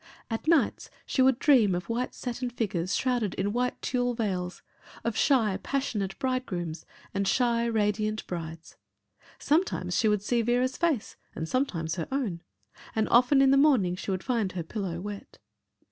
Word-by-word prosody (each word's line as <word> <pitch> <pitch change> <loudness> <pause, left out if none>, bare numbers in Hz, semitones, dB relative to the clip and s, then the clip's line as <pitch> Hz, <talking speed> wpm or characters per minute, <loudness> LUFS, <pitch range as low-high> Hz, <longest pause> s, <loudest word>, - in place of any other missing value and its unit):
At 225 +6 -3
nights 325 -3 +2 0.2
she 265 - 0
would 260 -1 +5
dream 240 -10 +4
of 180 - -4
white 240 +2 -2
satin 245 0 -4
figures 190 -7 -2
shrouded 245 -7 0
in 200 +2 -1
white 250 +1 -1
tulle 245 -1 0
veils, 185 -6 -3 0.4
of 230 -2 -1
shy, 225 -8 +3
passionate 210 -9 -2
bridegrooms 190 - -3 0.3
and 200 0 0
shy, 235 -1 +2
radiant 215 -1 0
brides. 165 -2 -7 0.6
Sometimes 285 - 0
she 220 - +3
would 210 -2 +1
see 235 +2 +1
Vera's 245 +3 +1
face 315 -10 -1 0.2
and 160 - -4
sometimes 170 - -1
her 165 - -3
own 230 -12 -2 0.5
and 220 -1 +1
often 255 +3 +5
in 270 - +5
the 275 - +5
morning, 255 -12 +4
she 185 - -7
would 190 -1 -1
find 230 -7 0
her 175 -2 -3
pillow 180 -1 -4
wet. 205 +2 -8
225 Hz, 160 wpm, -28 LUFS, 185-255 Hz, 0.6 s, would